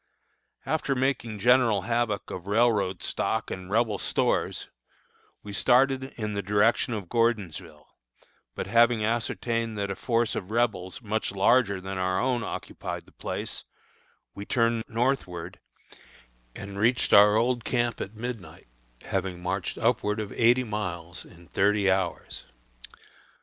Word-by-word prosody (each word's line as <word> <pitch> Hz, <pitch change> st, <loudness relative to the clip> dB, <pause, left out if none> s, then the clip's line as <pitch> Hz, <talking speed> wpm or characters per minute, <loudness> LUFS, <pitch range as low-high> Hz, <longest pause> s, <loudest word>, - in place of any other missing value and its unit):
After 150 Hz, -3 st, 0 dB
making 125 Hz, -4 st, -1 dB
general 115 Hz, -2 st, +4 dB
havoc 115 Hz, -2 st, -1 dB
of 90 Hz, 0 st, -7 dB
railroad 105 Hz, -4 st, +2 dB
stock 110 Hz, 0 st, -2 dB
and 95 Hz, 0 st, -6 dB
Rebel 110 Hz, -1 st, +1 dB
stores, -, -, 0 dB, 0.8 s
we 105 Hz, -, -8 dB
started 130 Hz, +4 st, +3 dB
in 105 Hz, -2 st, -3 dB
the 100 Hz, -, -2 dB
direction 105 Hz, +4 st, +2 dB
of 100 Hz, -4 st, -6 dB
Gordonsville, 100 Hz, -9 st, -1 dB, 0.7 s
but -, -, -3 dB
having 115 Hz, +1 st, +3 dB
ascertained 115 Hz, 0 st, -1 dB
that 100 Hz, -1 st, -2 dB
a -, -, -3 dB
force 115 Hz, 0 st, 0 dB
of 95 Hz, -, -4 dB
Rebels 110 Hz, -3 st, -1 dB
much 110 Hz, +1 st, -1 dB
larger 100 Hz, +1 st, +3 dB
than 95 Hz, 0 st, -5 dB
our 95 Hz, 0 st, 0 dB
own 125 Hz, -2 st, 0 dB
occupied -, -, -6 dB
the -, -, -20 dB
place, -, -, -5 dB, 0.7 s
we 100 Hz, -, -7 dB
turned 115 Hz, 0 st, +1 dB
northward, 110 Hz, -8 st, -2 dB, 1.0 s
and 100 Hz, 0 st, -7 dB
reached 120 Hz, +4 st, +2 dB
our 105 Hz, +1 st, +8 dB
old 120 Hz, +1 st, +1 dB
camp 120 Hz, -2 st, -1 dB
at 100 Hz, -, -6 dB
midnight, 115 Hz, -3 st, -7 dB, 0.4 s
having 95 Hz, -2 st, -3 dB
marched 90 Hz, +1 st, -3 dB
upward 105 Hz, +1 st, +1 dB
of 105 Hz, -2 st, -4 dB
eighty 120 Hz, +2 st, +3 dB
miles 90 Hz, -6 st, -5 dB
in 85 Hz, 0 st, -17 dB
thirty 100 Hz, -1 st, +2 dB
hours. 95 Hz, -2 st, -2 dB
105 Hz, 135 wpm, -27 LUFS, 95-120 Hz, 1.0 s, our